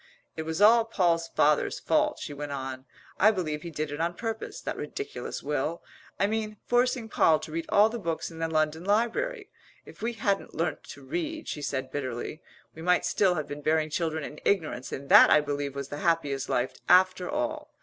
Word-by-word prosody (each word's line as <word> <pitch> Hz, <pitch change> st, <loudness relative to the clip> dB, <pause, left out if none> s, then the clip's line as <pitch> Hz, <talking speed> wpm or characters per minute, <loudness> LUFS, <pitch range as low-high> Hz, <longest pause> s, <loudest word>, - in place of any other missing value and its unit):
It 160 Hz, 0 st, -5 dB
was 160 Hz, +5 st, +1 dB
all 230 Hz, +2 st, +7 dB
Poll's 175 Hz, -7 st, +1 dB
father's 150 Hz, -2 st, +2 dB
fault," -, -, +1 dB
she -, -, -6 dB
went 145 Hz, 0 st, -6 dB
on. 130 Hz, -1 st, -5 dB, 0.3 s
"I 210 Hz, -, +7 dB
believe 160 Hz, -8 st, -2 dB
he 170 Hz, -, -6 dB
did 155 Hz, -2 st, -4 dB
it 145 Hz, +2 st, -4 dB
on 170 Hz, +1 st, -1 dB
purpose 225 Hz, +1 st, -5 dB
that -, -, -4 dB
ridiculous 420 Hz, 0 st, -6 dB
will, 150 Hz, +3 st, -2 dB, 0.4 s
I 200 Hz, -, +4 dB
mean, 215 Hz, 0 st, -2 dB
forcing 245 Hz, -1 st, +1 dB
Poll 160 Hz, -7 st, +4 dB
to 155 Hz, -, -9 dB
read 165 Hz, +1 st, -3 dB
all 205 Hz, +2 st, +6 dB
the 235 Hz, +1 st, -5 dB
books 170 Hz, -3 st, -3 dB
in 165 Hz, -, -10 dB
the 165 Hz, -, 0 dB
London 155 Hz, 0 st, 0 dB
Library. 410 Hz, -, 0 dB, 0.3 s
If -, -, -14 dB
we 235 Hz, +2 st, -1 dB
hadn't 200 Hz, -3 st, -1 dB
learnt -, -, -2 dB
to -, -, -11 dB
read," 325 Hz, -2 st, -4 dB
she 150 Hz, -, -4 dB
said 135 Hz, -2 st, -3 dB
bitterly, 130 Hz, +2 st, -4 dB, 0.3 s
"we 160 Hz, -, -10 dB
might 180 Hz, +1 st, +2 dB
still 190 Hz, -3 st, +2 dB
have 155 Hz, -3 st, -3 dB
been 145 Hz, +1 st, -7 dB
bearing 155 Hz, +1 st, +1 dB
children 160 Hz, -1 st, -1 dB
in 150 Hz, -, -8 dB
ignorance 155 Hz, -10 st, 0 dB
and 140 Hz, +1 st, -6 dB
that -, -, +9 dB
I -, -, +7 dB
believe 145 Hz, -1 st, -3 dB
was 140 Hz, -1 st, -5 dB
the 145 Hz, -, -5 dB
happiest 145 Hz, -6 st, 0 dB
life 125 Hz, +1 st, 0 dB, 0.2 s
after 185 Hz, 0 st, +4 dB
all. 300 Hz, 0 st, -2 dB
165 Hz, 200 wpm, -28 LUFS, 150-215 Hz, 0.4 s, that